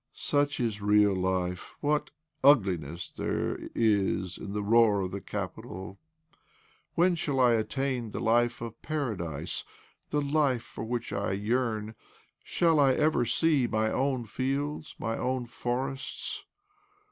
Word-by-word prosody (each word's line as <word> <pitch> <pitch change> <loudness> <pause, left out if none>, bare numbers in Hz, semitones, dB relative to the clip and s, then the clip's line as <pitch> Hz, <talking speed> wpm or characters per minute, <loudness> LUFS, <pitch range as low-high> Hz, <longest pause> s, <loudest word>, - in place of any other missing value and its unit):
" - - -52 0.2
Such 145 0 +2
is 110 -4 -1
real 105 -1 +4
life! 90 -1 -2
What 150 0 0 0.3
ugliness 90 - +3
there - - -2 0.2
is 100 -4 +1
in 100 - -6
the 105 0 -2
roar 110 -1 +5
of 90 -1 -3
the 100 +1 -5
capital! 95 +2 -6 1.0
When 175 +2 +4
shall 145 -5 -1
I 125 -2 +6
attain 125 +1 -1
the 105 - -5
life 120 +1 +2
of 115 -1 -7
paradise— 90 - -3 0.5
the 150 - +1
life 140 -4 +1
for - - -8
which 120 -1 -3
I 100 0 -1
yearn? 110 +1 -1 0.5
Shall 165 -3 +2
I 135 -2 +5
ever 150 -4 +2
see 140 +2 +3
my 110 0 +1
own 130 -2 0
fields, 140 +7 -2
my 115 0 -2
own 130 -1 -1
forests 130 +3 -4
120 Hz, 135 wpm, -29 LUFS, 100-135 Hz, 1.0 s, I